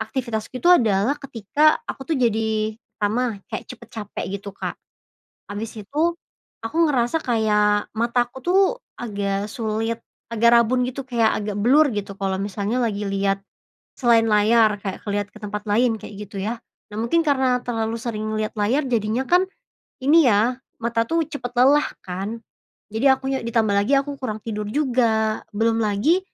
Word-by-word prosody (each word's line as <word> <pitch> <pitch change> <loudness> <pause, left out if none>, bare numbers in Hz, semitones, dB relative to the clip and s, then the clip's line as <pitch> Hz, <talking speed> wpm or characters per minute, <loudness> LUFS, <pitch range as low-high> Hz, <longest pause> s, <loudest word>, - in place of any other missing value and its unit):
aktivitasku 235 0 -4
itu 350 - +4
adalah 225 - +3
ketika 280 +4 +2
aku 270 - -5
tuh - - 0
jadi, 220 -2 0 0.2
pertama 215 0 0
kayak - - -4
cepet 235 -3 -11
capek 210 -3 -5 0.2
gitu, 200 - -7
Kak. - - -5 0.7
Habis 215 +2 -5
itu 310 +11 0 0.5
aku 225 +8 -5
ngerasa 255 +5 +1
kayak 210 -3 +2
mataku 240 +2 0
tuh 370 +2 +4 0.4
agak 200 -3 -2
sulit, 225 +1 -2 0.3
agak 230 +1 +4
rabun 250 +2 +2
gitu, 270 +2 -4
kayak 230 -3 +3
agak 205 -1 -3
blur, 280 +8 +5
gitu, 200 -1 -4
kalau 195 -1 -1
misalnya 205 +4 -2
lagi 205 -2 -2
liat 195 0 0 0.6
selain 235 -3 +4
layar 210 0 +4
kayak 195 -1 -5
ke - - -8
liat 205 0 -1
ke - - -14
tempat 210 +1 -5
lain, 225 +1 +2
kayak 210 - -9 0.2
gitu, 200 - -6
ya. 220 +4 -2 0.3
Nah, 210 - -8
mungkin 285 +9 +2
karena 260 -3 +3
terlalu 225 -1 -1
sering 215 -2 -3
liat 215 +1 -2
layar 250 +8 +1
jadinya 235 +1 0
kan, 355 +4 +4 0.6
ini 300 +2 +5
ya, 230 +4 +2 0.2
mata 230 0 0
tuh 330 0 +2
cepet 245 -4 -5
lelah 280 +4 +5 0.2
kan. 195 +6 -5 0.5
Jadi 220 +6 -1
akunya 265 0 +1
ditambah 225 -2 +1
lagi 200 +7 +2
aku 280 0 -4
kurang 215 -5 -4
tidur 210 -2 -4
juga, 230 -5 +1
belum 225 +1 +2
lagi 215 - +2
225 Hz, 160 wpm, -22 LUFS, 210-255 Hz, 0.7 s, blur